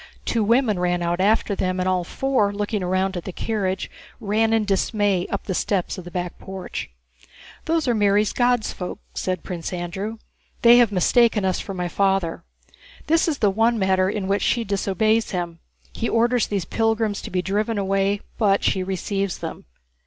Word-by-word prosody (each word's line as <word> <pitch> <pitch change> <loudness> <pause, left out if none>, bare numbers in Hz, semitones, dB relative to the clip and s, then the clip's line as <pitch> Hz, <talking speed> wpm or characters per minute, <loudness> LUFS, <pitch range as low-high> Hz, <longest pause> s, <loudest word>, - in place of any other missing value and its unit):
Two 230 -2 +1
women 225 -2 +2
ran 175 -1 0
out 175 +1 0
after 210 +1 +2
them, 185 -1 -1
and 185 - 0
all 185 -1 +1
four, 250 +1 0
looking 205 0 -2
round 185 +1 0
at 175 - -4
the 190 - -5
carriage, 190 -1 -2 0.3
ran 220 +2 +1
in 225 -1 +2
dismay 200 -1 +1
up - - -3
the 190 - -3
steps 185 0 -1
of 185 - -9
the - - -7
back 175 0 -4
porch. 190 -1 -6 0.8
"Those 325 -3 0
are 245 - +3
Mary's 205 -1 +2
'God's 245 -2 +1
folk,'" 180 - -5 0.2
said 185 -1 -2
Prince 170 -3 -5
Andrew. 190 +5 -4 0.5
"They 240 +1 +8
have 235 -3 +4
mistaken 210 +2 +3
us 185 -1 0
for 195 - -6
my 180 -1 -2
father. 195 -2 0 0.6
This 330 +3 +3
is 310 -4 0
the 205 -5 +2
one 225 +3 +2
matter 190 -2 +2
in 200 -2 -3
which 200 +1 +1
she 235 - +1
disobeys 215 +2 +1
him. 175 -3 -4 0.3
He 230 - -2
orders 235 0 +2
these 200 -4 -2
pilgrims 225 -2 0
to - - -7
be 180 -1 -1
driven 210 +4 -1
away, 195 +1 +1 0.2
but 200 -3 +3
she 190 - +1
receives 195 +1 -2
them." - - -7
200 Hz, 180 wpm, -23 LUFS, 185-225 Hz, 0.8 s, They